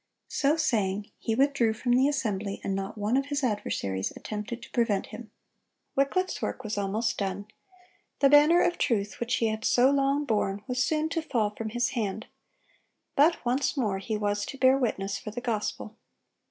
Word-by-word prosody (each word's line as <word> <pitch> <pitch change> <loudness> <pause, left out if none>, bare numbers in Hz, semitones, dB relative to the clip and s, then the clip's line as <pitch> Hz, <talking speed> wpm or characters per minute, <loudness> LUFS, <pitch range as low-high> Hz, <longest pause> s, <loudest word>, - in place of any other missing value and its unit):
(120) - - -10
So 295 +3 +2
saying, 205 -8 0
he 225 - -1
withdrew 265 -4 +2
from 245 +2 -1
the 260 +3 +4
assembly, 215 -8 -2
and 195 - -1
not 195 +3 -4
one 210 +4 0
of 275 +1 +1
his 285 0 -2
adversaries 100 - -1
attempted 220 +3 -6
to - - -12
prevent 230 -5 +1
him. 235 -3 -10 0.7
Wycliffe's 370 +8 0
work 260 - -3
was 215 -1 -3
almost 215 +4 -1
done; 200 0 -3 0.7
the 280 - +5
banner 295 +5 +6
of 350 - 0
truth 205 -6 0
which 240 +1 0
he 225 - +1
had 215 0 -4
so 255 +2 +4
long 280 +1 +1
borne 205 -4 -1
was 250 0 0
soon 310 +2 0
to 330 0 -1
fall 225 -9 0
from 220 +1 -5
his 240 +2 0
hand; 215 -3 -3 0.9
but 305 0 +3
once 260 +4 0
more 210 -7 0
he 215 +2 -3
was 205 -1 -1
to 275 - -7
bear 260 0 +5
witness 200 -6 -1
for - - -7
the 220 +3 -5
gospel. 220 -2 -3
235 Hz, 185 wpm, -28 LUFS, 210-275 Hz, 0.9 s, banner